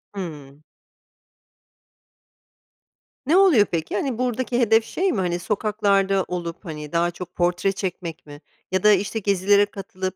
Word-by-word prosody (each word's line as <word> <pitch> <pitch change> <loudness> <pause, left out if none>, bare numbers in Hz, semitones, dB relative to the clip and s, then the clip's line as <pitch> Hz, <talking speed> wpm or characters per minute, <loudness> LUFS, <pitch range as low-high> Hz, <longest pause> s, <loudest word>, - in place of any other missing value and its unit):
Hımm. 150 -6 -8 2.6
Ne 315 +7 +3
oluyor 345 - +6
peki? 165 -2 -3
Hani, 245 +2 -2
buradaki 250 0 -1
hedef 225 -2 +4
şey 380 +1 -1
mi? 210 - -1
Hani, 175 -1 -1
sokaklarda 200 -1 +1
olup, 175 +1 -5
hani, 150 -3 -7
daha 170 +1 +1
çok 175 0 -10
portre 175 +2 +1
çekmek 180 -4 -5
mi? 145 0 -12 0.3
Ya 190 0 0
da, 210 - +7
işte, 205 +3 +1
gezilere 200 0 +3
katılıp, 190 -2 -6
195 Hz, 135 wpm, -23 LUFS, 175-215 Hz, 2.6 s, da